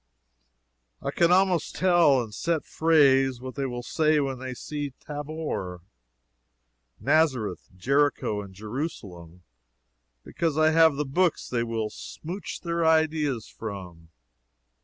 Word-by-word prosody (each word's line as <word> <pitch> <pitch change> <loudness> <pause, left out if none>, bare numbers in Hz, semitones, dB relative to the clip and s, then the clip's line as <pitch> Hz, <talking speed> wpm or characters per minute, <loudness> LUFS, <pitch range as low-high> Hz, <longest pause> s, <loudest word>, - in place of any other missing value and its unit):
I - - -3
can 170 0 +3
almost 185 -2 +2
tell, 170 -8 +4
in 110 - -10
set 165 +8 -1
phrase, 135 -5 +3
what 130 +1 -7
they 140 -1 -2
will 120 -1 -5
say 155 +3 +2
when 135 -3 -2
they 130 -1 -6
see 145 0 -5
Tabor, 145 - -5 1.2
Nazareth, 130 - +1
Jericho 140 -2 +1
and 100 -1 -10
Jerusalem 95 - -7 0.8
because 160 -3 -2
I 155 0 +4
have 160 -2 +5
the 150 +1 -1
books 170 +5 +1
they 120 -2 -1
will 115 -2 -2
"smouch" 180 +5 -7
their 170 -1 -1
ideas 155 -6 +2
from. 90 -6 -8
140 Hz, 120 wpm, -26 LUFS, 115-160 Hz, 1.2 s, have